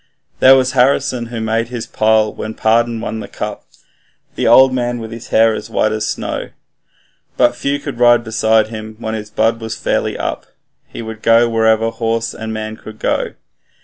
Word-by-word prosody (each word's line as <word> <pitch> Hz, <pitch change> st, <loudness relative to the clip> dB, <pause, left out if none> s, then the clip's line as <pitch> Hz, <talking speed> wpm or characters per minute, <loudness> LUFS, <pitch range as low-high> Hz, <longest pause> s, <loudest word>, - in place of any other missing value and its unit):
There 130 Hz, +1 st, +8 dB
was 130 Hz, -1 st, +2 dB
Harrison, 130 Hz, -2 st, +1 dB
who 115 Hz, -1 st, -6 dB
made 110 Hz, +1 st, -1 dB
his 120 Hz, -2 st, -5 dB
pile 110 Hz, 0 st, +2 dB
when 110 Hz, 0 st, -6 dB
Pardon 115 Hz, +1 st, +1 dB
won 110 Hz, -1 st, -4 dB
the -, -, -7 dB
cup, -, -, -6 dB, 0.7 s
The -, -, -1 dB
old 130 Hz, 0 st, +6 dB
man 120 Hz, -1 st, -1 dB
with 115 Hz, -1 st, -7 dB
his 115 Hz, 0 st, -9 dB
hair 115 Hz, 0 st, +4 dB
as -, -, -6 dB
white 110 Hz, -, +1 dB
as 110 Hz, 0 st, -2 dB
snow; -, -, -4 dB, 0.9 s
But 120 Hz, 0 st, +3 dB
few 140 Hz, +3 st, -1 dB
could 140 Hz, -4 st, -7 dB
ride 120 Hz, -1 st, +5 dB
beside 110 Hz, -1 st, +2 dB
him 110 Hz, -1 st, -8 dB
when 110 Hz, -1 st, -4 dB
his 105 Hz, -1 st, -5 dB
blood 115 Hz, +2 st, 0 dB
was 110 Hz, 0 st, -4 dB
fairly -, -, -1 dB
up -, -, -4 dB, 0.4 s
He -, -, -8 dB
would 110 Hz, -1 st, -8 dB
go 115 Hz, +1 st, +4 dB
wherever 110 Hz, 0 st, +2 dB
horse 115 Hz, 0 st, -2 dB
and 110 Hz, 0 st, -6 dB
man 110 Hz, 0 st, -5 dB
could 110 Hz, 0 st, -11 dB
go. -, -, -1 dB
115 Hz, 185 wpm, -17 LUFS, 110-120 Hz, 0.9 s, There